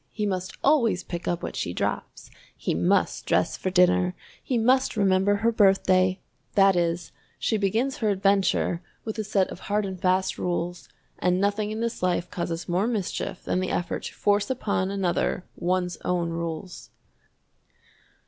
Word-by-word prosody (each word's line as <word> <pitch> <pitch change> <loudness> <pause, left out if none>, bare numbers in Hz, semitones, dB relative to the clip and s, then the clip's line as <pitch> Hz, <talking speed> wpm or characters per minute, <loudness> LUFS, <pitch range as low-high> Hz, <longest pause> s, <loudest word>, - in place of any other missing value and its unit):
"He 210 - -3
must 185 -2 -3
always 235 -11 +3
pick 175 -1 -6
up 175 -1 -1
what - - -4
she 85 - -2
drops." - - -3 0.3
"He - - -1
must 85 +2 +1
dress - - +2
for 185 - -2
dinner." 180 0 +3 0.3
"He 255 - -1
must 255 +1 +2
remember 195 0 +3
her 225 +3 +2
birthday." 190 -3 +3 0.4
That 195 -1 +5
is, 170 -1 -1 0.3
she 225 - 0
begins 220 +6 0
her 220 - 0
adventure 195 -3 +2 0.2
with 220 0 -4
a - - 0
set 200 -2 +1
of - - -8
hard 205 +1 -1
and 190 -2 -6
fast 185 +1 +1
rules, 175 0 -3 0.3
and 180 0 +2
nothing 205 +1 0
in 215 +1 -4
this 235 0 -2
life 180 -1 0
causes 170 -1 -3
more 180 +5 +1
mischief 205 -5 -3
than - - 0
the 185 - -1
effort 175 - -2
to - - -6
force 205 0 +1
upon 205 -7 -1
another 185 -2 -1
one's 180 0 -1
own 175 -2 -1
rules! 170 +2 -5
190 Hz, 165 wpm, -26 LUFS, 180-210 Hz, 0.4 s, That